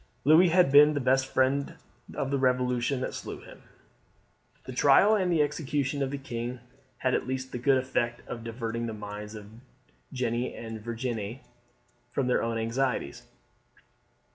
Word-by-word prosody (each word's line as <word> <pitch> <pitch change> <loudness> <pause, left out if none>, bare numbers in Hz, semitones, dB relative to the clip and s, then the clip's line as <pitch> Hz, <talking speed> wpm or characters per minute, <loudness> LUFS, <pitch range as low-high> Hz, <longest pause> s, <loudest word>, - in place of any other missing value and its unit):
Louis 160 +5 +6
had 175 -4 +4
been 150 +1 +7
the - - +1
best 130 0 +2
friend 135 +2 +1 0.4
of 135 - -2
the 140 - +1
Revolution 125 0 +1
that - - -3
slew - - -7
him. - - -14 1.0
The 130 - -7
trial 145 +11 +5
and 190 -4 +1
execution 145 -3 0
of 135 - 0
the 140 - -4
king 120 -2 -5 0.4
had 130 -1 0
at - - 0
least 130 0 -4
the 125 - -4
good 135 +2 +3
effect 120 -2 -2
of 115 -2 -6
diverting 115 0 -4
the 110 - -4
minds 105 +1 -7
of 105 -1 -9 0.7
Jeanne 125 -2 -2
and 115 -1 -7
Virginie 115 +1 -4 0.7
from 135 - -1
their 125 - +2
own 115 0 -1
anxieties. 115 - -1
130 Hz, 155 wpm, -28 LUFS, 115-140 Hz, 1.0 s, been